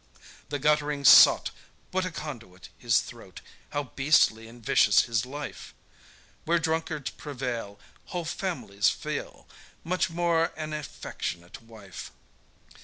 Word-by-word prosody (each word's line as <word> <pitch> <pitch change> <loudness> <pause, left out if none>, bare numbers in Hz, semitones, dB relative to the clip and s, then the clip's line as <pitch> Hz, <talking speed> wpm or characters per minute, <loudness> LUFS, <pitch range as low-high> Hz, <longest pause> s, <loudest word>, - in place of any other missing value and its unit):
The 145 - -2
guttling 150 0 +1
sot, - - +8 0.4
What 185 0 0
a - - -2
conduit 115 - -8
his - - +2
throat! - - -11 0.3
How 145 - -2
beastly 130 -4 +2
and 115 0 -15
vicious 100 -3 +5
his 115 0 -1
life! 140 -5 -8 0.7
Where 170 +2 +2
drunkards 160 -3 -2
prevail, 125 -8 -5 0.3
Whole 175 -2 -4
families 135 - -1
feel, - - -5 0.4
Much 185 +1 0
more 165 -1 +1
an 155 -1 -5
affectionate 90 - -6
wife. 110 -5 -11
145 Hz, 115 wpm, -27 LUFS, 115-160 Hz, 0.7 s, sot